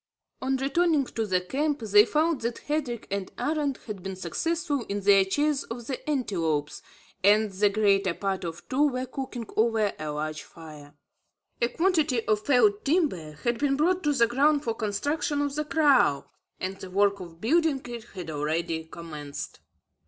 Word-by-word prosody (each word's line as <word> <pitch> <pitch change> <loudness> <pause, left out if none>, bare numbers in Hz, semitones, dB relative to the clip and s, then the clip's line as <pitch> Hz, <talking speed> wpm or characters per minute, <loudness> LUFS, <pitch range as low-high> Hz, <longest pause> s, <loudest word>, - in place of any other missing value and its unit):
On 265 0 0
returning 290 +2 +2
to 225 -3 -3
the 185 -2 +1
camp, 285 +8 -1
they 210 -1 +6
found 310 0 +1
that 235 +1 -2
Hendrik 285 -6 -3
and 200 -1 -3
Arend 295 -3 -1
had 210 -4 -6
been 190 +1 -5
successful 290 - -2
in 200 0 -2
their 195 0 +6
chase 290 +8 +1
of 235 0 -7
the 265 +4 -5
antelopes, 165 - -1 0.4
and 210 +1 +4
the 200 +2 +2
greater 200 -3 +2
part 195 -1 -2
of 170 0 -6
two 285 +3 +3
were 255 -2 -2
cooking 255 -2 -6
over 220 -2 +2
a 155 - -4
large 155 +1 -3
fire. 150 -3 -13 0.7
A 235 - +4
quantity 315 -6 +1
of 215 -1 +1
felled 405 - +3
timber 275 - 0
had 240 -1 0
been 285 -1 +2
brought 360 +5 +2
to 295 -3 +1
the 235 -4 +4
ground 285 +5 +2
for 230 - -1
construction 285 +8 -1
of 285 -1 -1
the 300 +1 -2
kraal, 280 - +3 0.3
and 190 +1 -4
the 190 - -9
work 200 +1 +2
of 170 -3 -10
building 310 - +2
it 240 -2 -7
had 175 -4 -6
already 160 +2 -2
commenced. 155 -3 -8
230 Hz, 170 wpm, -27 LUFS, 190-290 Hz, 0.7 s, they